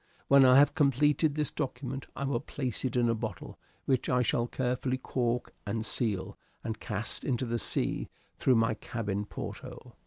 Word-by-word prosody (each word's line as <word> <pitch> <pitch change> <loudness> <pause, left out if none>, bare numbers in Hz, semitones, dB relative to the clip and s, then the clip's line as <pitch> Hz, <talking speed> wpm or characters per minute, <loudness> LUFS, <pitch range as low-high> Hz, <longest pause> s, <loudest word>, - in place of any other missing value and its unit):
When 140 -1 +7
I 130 0 +7
have 145 +1 +6
completed 150 0 +3
this 150 -1 0
document 135 -2 -4
I - - -3
will 135 -3 0
place 130 -3 -4
it 130 - -1
in 120 -1 +3
a 115 - +3
bottle, 110 -4 -6 0.3
which 130 -3 +1
I 125 0 +3
shall 120 +1 +1
carefully 125 +1 -1
cork 125 -2 -1
and 110 +2 -2
seal 105 -7 -1 0.3
and - - -4
cast - - -4
into 130 0 0
the 120 0 -1
sea - - -1 0.3
through 130 - +3
my 115 0 +3
cabin 105 -3 -3
porthole. - - -8
125 Hz, 175 wpm, -30 LUFS, 115-135 Hz, 0.3 s, When